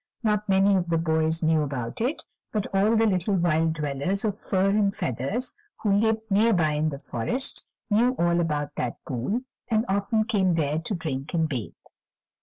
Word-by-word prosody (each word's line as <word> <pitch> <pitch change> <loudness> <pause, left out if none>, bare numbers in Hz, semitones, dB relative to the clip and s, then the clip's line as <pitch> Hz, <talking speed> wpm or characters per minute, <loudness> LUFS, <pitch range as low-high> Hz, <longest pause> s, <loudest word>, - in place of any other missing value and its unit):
Not 210 -1 0
many 195 +1 +4
of 180 -2 0
the 165 - +2
boys 160 0 +1
knew 160 -1 +3
about 135 - -4
it, 260 +7 -1 0.3
but 210 -3 -1
all 205 +4 +3
the 225 0 +4
little 195 -1 +1
wild 165 -2 +2
dwellers 150 +6 -1
of 205 -3 0
fur 195 -2 +1
and 205 -1 +2
feathers, 135 - -2 0.3
who 205 -2 +3
lived 220 +2 +2
near 220 +4 +4
by 160 -5 +2
in 150 +1 +1
the 140 - -5
forest, 145 - -2 0.2
knew 235 +4 +3
all 170 0 +2
about 150 -3 -1
that 120 -2 -2
pool, 130 - -2 0.3
and 220 0 +1
often 200 +3 +1
came 195 -6 +1
there 150 -1 0
to 180 +5 -2
drink 155 -2 -4
and 160 -1 +2
bathe. 125 -8 -4
180 Hz, 185 wpm, -26 LUFS, 155-210 Hz, 0.3 s, many